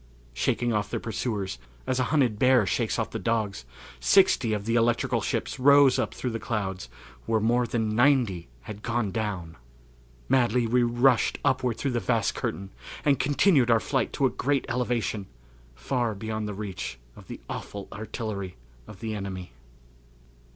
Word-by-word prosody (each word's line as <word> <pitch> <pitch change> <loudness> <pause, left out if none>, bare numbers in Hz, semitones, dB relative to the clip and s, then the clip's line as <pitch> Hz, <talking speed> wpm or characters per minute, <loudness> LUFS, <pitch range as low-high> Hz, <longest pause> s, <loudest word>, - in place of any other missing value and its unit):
Shaking 120 - 0
off 105 -1 -1
their - - -2
pursuers, 105 - -3 0.3
as 130 0 0
a 130 - +2
hunted 125 -9 +1
bear 125 -4 +5
shakes 110 +5 0
off 115 -1 -2
the 110 - -4
dogs, 105 - -1 0.3
sixty 190 - +4
of 105 -2 -2
the 115 - 0
electrical 115 0 +2
ships - - -2
rose 140 0 +6
up - - -2
through 125 - -3
the 115 - -3
clouds 95 - -3 0.4
where 110 -1 +2
more 120 +3 +2
than 110 -2 -1
ninety 120 -9 +3
had 100 - -9
gone 120 -3 -1
down! 95 -8 -4 0.7
Madly 125 -2 +3
we 125 +2 +2
rushed 120 +1 +3
upward 125 -3 +1
through 140 - -1
the 120 - 0
vast 115 -2 0
curtain 95 0 -4 0.3
and 140 -2 +3
continued 145 -2 +3
our 115 -1 +5
flight 130 +1 -1
to 140 - +1
a 130 - +2
great 140 0 0
elevation, 120 -5 -1 0.5
far 110 - -1
beyond 110 +1 -4
the 105 - -5
reach 95 - -5 0.2
of - - -14
the - - -8
awful 100 -1 -6
artillery 105 -3 -5 0.3
of 105 0 -12
the 110 -1 -3
enemy. 95 - -6
115 Hz, 165 wpm, -27 LUFS, 105-125 Hz, 0.7 s, rose